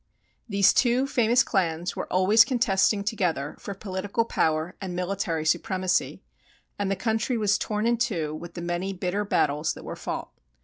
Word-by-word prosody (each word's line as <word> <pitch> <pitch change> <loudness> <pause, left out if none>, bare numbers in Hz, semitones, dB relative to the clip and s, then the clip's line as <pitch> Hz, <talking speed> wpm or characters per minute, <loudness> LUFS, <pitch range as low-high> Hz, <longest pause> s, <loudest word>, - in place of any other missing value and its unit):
These 200 -1 +4
two 250 +1 +3
famous 245 -2 +3
clans 175 -3 -1
were - - -5
always 195 +5 +6
contesting 215 -5 +2
together 180 -9 -1
for 200 - -6
political 200 +3 -2
power 160 -4 0
and 185 -2 -5
military 180 -3 -2
supremacy, 185 +2 0 0.6
and 200 -1 0
the 195 - +1
country 225 +4 -1
was 210 -2 +2
torn 210 0 -2
in 235 0 +2
two 180 -11 -1
with 170 +2 -8
the 170 - -5
many 175 +3 -2
bitter 185 +2 -2
battles 150 -6 0
that - - -11
were - - -5
fought. - - -5
195 Hz, 165 wpm, -26 LUFS, 175-220 Hz, 0.6 s, always